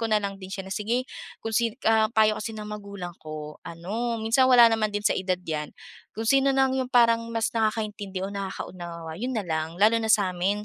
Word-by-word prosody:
ko 225 - -1
na 215 - +3
lang 200 -1 -5
din 185 - -8
siya 195 -1 -5
na 190 - -6
sige 230 +5 -1 0.4
kung 225 - -3
si, 230 0 +1
ah 220 -1 +4
payo 215 -1 +4
kasi 225 +1 -4
ng 215 - -6
magulang 200 -4 -7
ko 155 -1 -8
ano, 215 +8 -3
minsan 240 +4 +3
wala 240 -2 +8
naman 215 -1 +1
din 205 0 -3
sa - - +4
edad 185 -1 -1
'yan, 150 -2 -4 0.4
kung 225 - -3
sino 275 +1 +4
nang 265 -1 +3
yung 260 -1 -1
parang 235 -2 +4
mas 225 -1 0
nakakaintindi 210 -4 -2
o 200 - -5
nakakaunawa 175 -4 -6
yun 255 +2 -2
na 210 - -1
lang. 160 -1 -3
Lalo 215 +4 +5
na 220 - -2
sa 205 -4 +3
amin 195 +4 -1
210 Hz, 220 wpm, -26 LUFS, 185-225 Hz, 0.4 s, wala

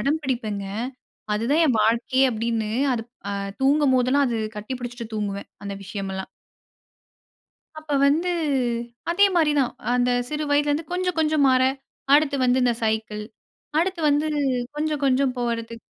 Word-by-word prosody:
அடம்பிடிப்பேங்க. 255 -9 -1 0.7
அதுதான் 240 +9 +1
என் 255 -6 +2
வாழ்க்கையே 235 +4 +2
அப்பிடின்னு 225 -1 -1 0.6
அ - - -2 0.3
தூங்கும்போதெல்லாம் 275 -1 +3
அது 235 -2 -1 0.2
கட்டி 210 +4 -5
பிடிச்சிட்டு 245 -1 -6
தூங்குவேன். 200 -2 -3 0.2
அந்த 200 - -4
விஷயமெல்லாம். 190 -1 -5 1.5
அப்ப 310 -1 -8
வந்து 315 +6 +2 0.8
அதேமாரிதான். 335 -8 +3 0.2
அ - - +1
அந்த 250 0 +2 0.2
சிறு 300 0 -2
வயதில 290 0 +3
இருந்து 300 +2 -1
கொஞ்சம் 360 -1 -1
கொஞ்சம் 305 -2 +3
மாற, 255 0 +4 0.5
அடுத்து 295 -1 +2
வந்து 250 +1 +3
இந்த 245 -1 +3
சைக்கிள், 220 -1 -1 0.6
அடுத்து 365 +1 0
வந்து 290 +1 +2 0.5
கொஞ்சம், 305 -1 -1
கொஞ்சம் 265 -1 +2
போறதுக்கு 230 -1 -2
260 Hz, 125 wpm, -24 LUFS, 230-300 Hz, 1.5 s, மாற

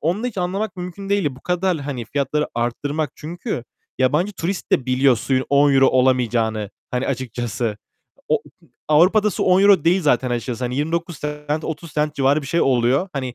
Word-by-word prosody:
onu 175 +7 -1
da - - 0
hiç 235 -6 -5
anlamak 190 +3 -2
mümkün 180 +2 -7
değildi. 195 -10 0
Bu - - -15
kadar, 180 0 0
hani, 135 -4 -4
fiyatları 145 +4 -1
arttırmak 140 +5 -2
çünkü 165 - -5 0.3
yabancı 150 +10 +2
turist 185 0 -4
de 130 - +2
biliyor 130 0 +3
suyun 130 +4 0
€10 140 -1 +5
olamayacağını, 120 -5 +1 0.2
hani, 125 +1 -1
açıkçası. 120 -4 -3 0.5
O - - +3
u - - -8 0.2
hı - - -23 0.2
Avrupa'da 185 +8 +4
su - - -2
€10 190 -2 +5
değil 180 +3 +3
zaten 130 -4 +2
açıkçası, 120 0 -3
hani, 125 +1 -3
29 165 +2 -2
cent, 150 +1 -3
30 160 -1 -6
cent 150 0 -1
civarı 140 +2 +2
bir - - -8
şey 170 +5 0
oluyor. 130 +6 +2
Hani, 130 -3 -4
145 Hz, 180 wpm, -21 LUFS, 125-175 Hz, 0.5 s, €10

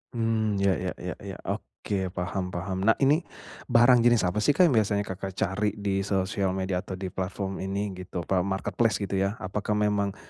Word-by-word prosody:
Mmm, 110 -2 +1
ya 100 - +4
ya 90 0 -2
ya 90 0 -5
ya, 100 -1 -7 0.2
oke, 100 -2 -3
paham 90 +1 -2
paham. 95 +1 -4
Nah 110 - +6
ini 145 +4 +5 0.5
barang 120 +1 +6
jenis 120 -2 +4
apa 90 +3 0
sih 145 +7 +3
Kak, 180 - +5
yang 165 - +5
biasanya 105 -1 +1
Kakak 95 0 -6
cari 105 +1 0
di 100 -1 -1
sosial 95 -1 0
media 95 -1 -1
atau 95 0 -6
di 95 -1 -5
platform 95 +1 -3
ini 100 +2 -2
gitu, 90 -1 -6
apa, 95 +2 +1
marketplace 100 +3 0
gitu 100 -1 -1
ya, 100 +3 0
apakah 105 +2 -2
memang, 105 -1 +1
100 Hz, 190 wpm, -27 LUFS, 95-105 Hz, 0.5 s, Nah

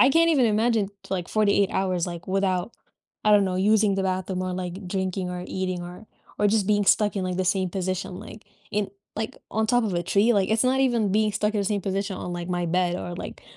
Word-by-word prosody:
I 260 - +7
can't 330 +2 +4
even 265 -6 +4
imagine 220 -1 +2 0.2
like 180 -2 -2
48 200 -2 +2
hours, 185 -2 0
like, 170 -1 -7
without, 190 +1 0 0.5
I 215 - +4
don't 205 -1 +6
know, 185 -1 -1
using 205 +1 +3
the 195 - 0
bathroom 185 0 -2
or, 185 0 -2
like, 180 +1 -5
drinking 185 -1 -2
or 180 0 -5
eating 185 -1 -3
or 180 +5 -10 0.3
or 205 - +3
just 210 -2 +2
being 205 0 +2
stuck 210 +1 +3
in, 190 - -1
like, 180 -1 -2
the 185 - 0
same 185 0 +1
position, 185 0 -3
like, 215 - -11 0.3
in 205 -1 -1 0.2
like, 220 +1 -4
on 220 0 0
top 245 +1 +2
of 210 - -1
a 175 - 0
tree, 205 +6 +3
like, 195 -3 +2
it's 225 +3 +2
not 260 +1 +2
even 235 -7 +2
being 215 +1 +3
stuck 210 +1 0
in 205 - +1
the - - -1
same 200 -2 -1
position 195 0 -2
on, 180 - -5
like, 175 0 -5
my 175 -1 -1
bed 180 +1 +1
or, 175 -1 -5
like, - - -8
195 Hz, 240 wpm, -25 LUFS, 185-215 Hz, 0.5 s, I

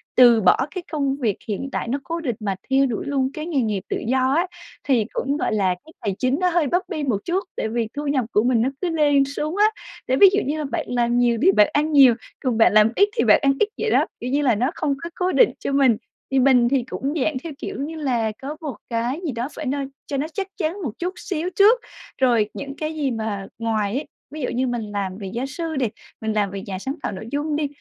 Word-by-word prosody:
từ 240 -3 +7
bỏ 180 -3 +5 0.2
cái 365 - -3
công 280 -3 0
việc 225 -8 0
hiện 225 +6 -3
tại - - -3
nó 275 +4 -1
cố 335 +1 -3
định 245 -7 -2
mà 200 -3 -2
theo 270 +1 +4
đuổi 240 -1 -3
luôn 270 -2 0
cái 305 - -5
nghề 315 -6 0
nghiệp 210 -4 -1
tự - - -1
do 260 +2 +2
á, 345 +4 +2 0.4
thì 240 -6 +2
cũng, 280 +2 -1
gọi - - -1
là, 190 -4 +2
cái 320 - -15
tài 200 -3 -2
chính 260 +3 +1
nó 365 -1 +3
hơi 340 -4 +2
bấp 355 +7 +2
bênh 290 -6 -3
một 210 - +2
chút, 370 +3 0
tại - - -1
vì 230 -1 -1
thu 295 0 -3
nhập 270 -4 +1
của 210 - +3
mình 245 -2 +3
nó 250 - +2
cứ 360 - 0
lên 290 -4 +3
xuống 300 +5 -3
á. 420 - +5 0.4
Để 260 - +2
ví 395 - +8
dụ 410 - +3
như 295 +3 -1
là 300 - -2
bạn 265 - -3
làm 240 -1 +1
nhiều 240 -1 +3
thì - - +6
bạn 210 +1 +5
ăn 300 +2 +1
nhiều, 270 -5 +7 0.2
còn 250 -4 -1
bạn 225 - +5
làm 215 +1 +6
ít 405 +1 +4
thì - - +3
bạn - - +6
ăn 275 -2 +4
ít 425 - +4
vậy 450 - 0
đó, - - +4
kiểu 245 - -4
như 280 +3 +1
là, 250 -6 +3
nó 250 +8 0
không 285 -2 0
có 335 - -4
cố 365 0 0
định - - +5
cho - - -3
mình, 270 -5 +4 0.3
thì 270 - +3
mình 250 -2 +5
thì 260 -2 +1
cũng 270 +3 -3
dạng 300 -2 0
theo 330 - -6
kiểu - - -6
như 315 +3 -4
là 245 -8 0
có 290 +3 -5
một 295 -4 -4
cái 240 +5 -1
gì 300 - -1
đó 235 +2 -3
phải 305 - -5
no 280 +2 -1 0.3
cho 280 - -2
nó 290 +3 -1
chắc 395 -2 -3
chắn 355 +3 -2
một 250 - -2
chút 360 +2 -2
xíu 350 -1 -3
trước, 435 +5 +6 0.4
rồi 230 -5 +3
những 275 0 -6
cái 310 0 -3
gì 285 -4 -1
mà 220 -4 -3
ngoài 215 -2 0
ấy 285 - -3 0.3
ví 310 - -6
dụ 250 - -1
như 255 +2 0
mình 240 -1 -2
làm 195 -2 -3
về 200 -2 -6
gia 240 +3 -2
sư 320 +4 -4
đi, 260 -4 +1 0.3
mình 220 -1 -1
làm 205 -2 0
việc 195 0 -6
nhà 190 -2 -5
sáng 265 +8 -4
tạo - - -2
nội 210 +3 -7
dung 295 +1 -1
đi 300 -1 0
270 Hz, 270 wpm, -22 LUFS, 230-305 Hz, 0.4 s, ví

